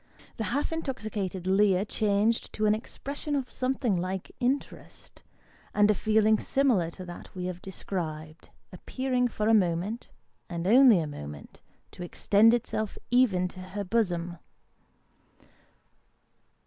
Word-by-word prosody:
The 220 - -2
half 280 +8 -1
intoxicated 215 - -4
leer 195 0 +3
changed 215 +2 +1
to 215 - -1
an 210 - +4
expression 280 +6 -4
of 265 -3 -3
something 255 -4 0
like 185 +1 -3
interest, 260 +3 -4 0.5
and 210 0 +5
a - - +3
feeling 215 +1 +3
similar 245 -12 +2
to 185 +2 -9
that 175 +2 -10
we 180 -1 -4
have 180 -1 -5
described, 160 -5 -6 0.2
appeared 255 -2 -1
for 215 - -1
a 225 - +5
moment, 190 +3 0 0.4
and 170 -1 -4
only 240 +1 +7
a 160 - -1
moment, 75 - -9 0.3
to - - -12
extend 205 +5 +4
itself 215 -3 -3
even 215 -8 +3
to 185 - -12
her 190 +2 -5
bosom. 180 -5 -1
205 Hz, 130 wpm, -28 LUFS, 180-235 Hz, 0.5 s, only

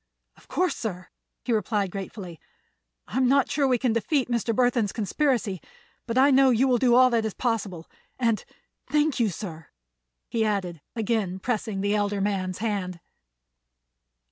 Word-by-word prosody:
"Of - - -22
course, 365 0 0
sir," 180 -5 -5 0.4
he 245 - +1
replied 210 -3 0
gratefully. 190 -4 -7 0.7
"I'm 255 +2 +1
not 275 0 +3
sure 280 -2 +2
we 255 -2 +3
can 245 -1 +1
defeat 260 +3 0
Mr. 235 -1 0
Burthon's 240 -3 +2
conspiracy, 220 - 0 0.5
but 230 +1 -2
I 275 +2 +6
know 270 0 +6
you 250 +2 +3
will 250 -2 +3
do 245 -1 +4
all 255 0 +6
that 230 -1 +2
is 220 -2 -3
possible. 200 -9 -2 0.3
And 230 -4 +1 0.4
thank 300 -2 +1
you, 230 -3 +3
sir," 165 -4 -7 0.6
he 230 -1 0
added, 190 -7 -2
again 215 -5 -1
pressing 215 -1 -2
the 205 +1 +1
elder 205 -1 0
man's 195 -2 -1
hand. 195 -5 -2
220 Hz, 155 wpm, -26 LUFS, 195-250 Hz, 0.7 s, I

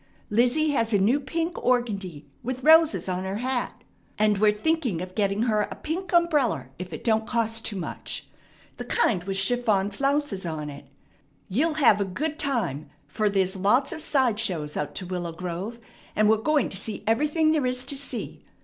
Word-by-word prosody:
Lizzie 250 +8 +3
has 230 -5 0
a - - +5
new 220 +9 +3
pink 325 +5 -2
organdie, 205 -11 -1 0.2
with 255 +1 -4
roses 320 -3 +5
on 185 0 -2
her 190 +1 -3
hat; 250 +3 -2 0.3
and 210 -1 +2
we're 210 0 +5
thinking 250 - 0
of 180 +1 -6
getting 200 +1 +1
her 215 -3 +2
a - - -6
pink 345 +4 -4
umbreller 300 - +2
if 180 -1 -6
it 155 - -7
don't 220 -1 +1
cost 225 -1 0
too 210 - -3
much. 185 - -5 0.5
The - - -6
kind 205 - +1
with 195 -1 -1
chiffon 205 -1 +2
flounces 275 -3 -1
on 155 -3 -4
it. 140 - -11 0.6
You'll 300 - +1
have 235 -9 +5
a - - +1
good 300 - -3
time, 235 - -1 0.2
fer 215 -2 0
there's 190 -1 +1
lots 215 +9 +2
of 315 - -5
side 260 -8 +1
shows 160 -9 -2
out 150 -1 -3
to 185 - -4
Willow 175 -2 -4
Grove, 180 +7 -5 0.4
and 215 - +4
we're 220 +1 +5
going 295 +5 +1
to 190 - -6
see 215 +2 -6
everything 300 +8 +2
there 300 -5 +1
is 250 0 0
to 280 - -1
see. 280 +1 -5
225 Hz, 185 wpm, -26 LUFS, 190-280 Hz, 0.6 s, a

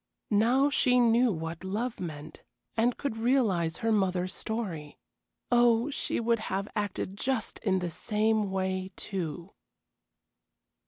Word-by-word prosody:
Now 245 +7 +4
she 250 -3 +3
knew 235 0 +4
what 165 -1 -5
love 220 +6 -3
meant, 155 -3 -7 0.3
and 235 +2 +2
could 275 -6 -3
realize 225 -9 +2
her 225 -1 0
mother's 185 -3 +1
story. 175 -10 -4 0.5
Oh, 240 +2 +4
she - - -2
would 230 0 +1
have 195 -2 -3
acted 205 -2 -2
just 250 +1 -2
in 195 -4 +1
the 180 -2 -2
same 215 +2 +1
way, 190 0 -2
too. 175 -2 -5
210 Hz, 125 wpm, -29 LUFS, 185-235 Hz, 0.5 s, Now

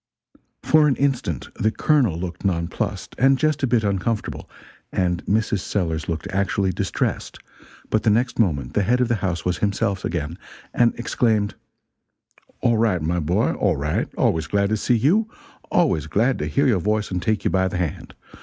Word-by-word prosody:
For 155 -1 +5
an 140 - +2
instant 125 - -1
the 110 - 0
Colonel 120 - +2
looked 85 0 -6
nonplussed, 85 -4 -2
and 135 +1 +5
just 155 0 +1
a 135 - +2
bit 115 -2 +2
uncomfortable; 100 +2 -2 0.4
and 90 -2 0
Mrs. 110 0 +1
Sellers 85 -5 -2
looked 80 -1 -3
actually 95 0 0
distressed; 90 -2 -2 0.5
but 110 - +2
the 110 - +2
next 120 +4 +1
moment 70 - +1
the 105 - +2
head 120 +6 +2
of 125 -2 +1
the 120 - +1
house 90 -3 -2
was 90 0 0
himself 100 -1 -1
again, 85 -1 -3 0.3
and 120 -1 +3
exclaimed: 110 -3 0 1.1
"All 115 -2 +2
right, 100 -8 +1
my 85 +3 0
boy, 90 +8 +1
all 95 -6 +1
right 75 +2 -1
always 80 -2 +1
glad 100 +1 +1
to 110 - +1
see 120 +3 +2
you 195 - +2 0.4
always 80 0 +2
glad 115 - +1
to - - -2
hear 140 - +1
your 115 -8 +3
voice 105 +2 -1
and 90 -1 -1
take 105 +3 -1
you - - +2
by 95 -1 +2
the 90 - -3
hand. 85 -4 -4
100 Hz, 180 wpm, -22 LUFS, 90-115 Hz, 1.1 s, For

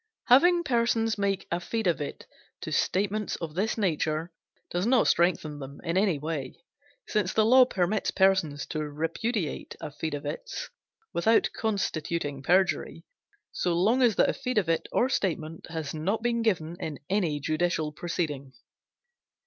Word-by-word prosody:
Having 345 +8 +6
persons 230 -4 +1
make 195 -1 0
affidavit 175 -3 -2 0.4
to - - -5
statements 205 +2 0
of 165 -3 -6
this 205 +8 -1
nature 165 -4 0 0.4
does 180 +4 0
not 250 -1 +4
strengthen 165 -4 +1
them 140 0 -9
in 170 0 -2
any 190 -4 +3
way, 145 -3 -4 0.5
since 210 -4 0
the 220 - +3
law 255 +3 +7
permits 195 -3 0
persons 190 -7 +2
to 155 - -4
repudiate 160 - -3
affidavits 145 0 -5 0.4
without 225 +6 +3
constituting 165 -8 -2
perjury, 185 +6 +1 0.5
so 175 -2 0
long 220 +9 +3
as 235 -5 +4
the - - +4
affidavit 210 -11 0
or 250 - +3
statement 165 -9 -2
has 160 -3 -4
not 195 +9 -1
been 235 -1 +1
given 175 -7 0
in 155 -6 -4
any 175 -7 0
judicial 155 +1 0
proceeding. 150 -5 -4
175 Hz, 130 wpm, -28 LUFS, 155-215 Hz, 0.5 s, law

